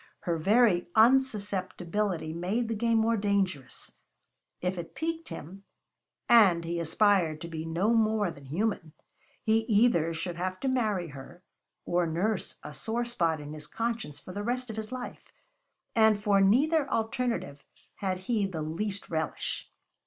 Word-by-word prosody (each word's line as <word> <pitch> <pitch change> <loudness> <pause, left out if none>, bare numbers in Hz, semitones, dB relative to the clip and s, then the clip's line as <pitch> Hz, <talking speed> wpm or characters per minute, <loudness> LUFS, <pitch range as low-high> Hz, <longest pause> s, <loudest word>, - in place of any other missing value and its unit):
Her 170 - -1
very 195 +1 +3
unsusceptibility 205 -7 +1
made 195 +8 -1
the - - 0
game 230 +1 +1
more 225 +1 +2
dangerous; 195 - -1 0.7
if 180 +1 -1
it 170 - -8
piqued 325 0 -3
him 190 +6 -9 0.6
and 190 -8 +6
he 170 +1 -2
aspired 170 -1 +2
to 170 - -5
be 160 -1 -5
no 175 +8 +1
more 215 -4 +2
than 140 -3 -13
human 165 +1 -2 0.5
he 220 0 +3
either 205 -7 +3
should 170 +1 -4
have 185 +1 -3
to 270 - -1
marry 215 -9 0
her, 145 +6 -11 0.4
or 175 0 +1
nurse 185 +5 -1
a 150 - -8
sore 230 +8 -2
spot 170 -10 0
in 150 0 -8
his 150 -1 -7
conscience 225 -6 -3
for 185 - -10
the 205 - -4
rest 245 +2 -2
of - - -7
his 220 0 -5
life; 255 -1 -6 0.7
and 220 -2 +5
for 200 -2 +4
neither 275 +9 +3
alternative 225 - -2 0.3
had 190 -2 -1
he 215 -4 +1
the 165 -5 -4
least 195 +6 -3
relish. 160 -1 -3
200 Hz, 155 wpm, -29 LUFS, 170-225 Hz, 0.7 s, and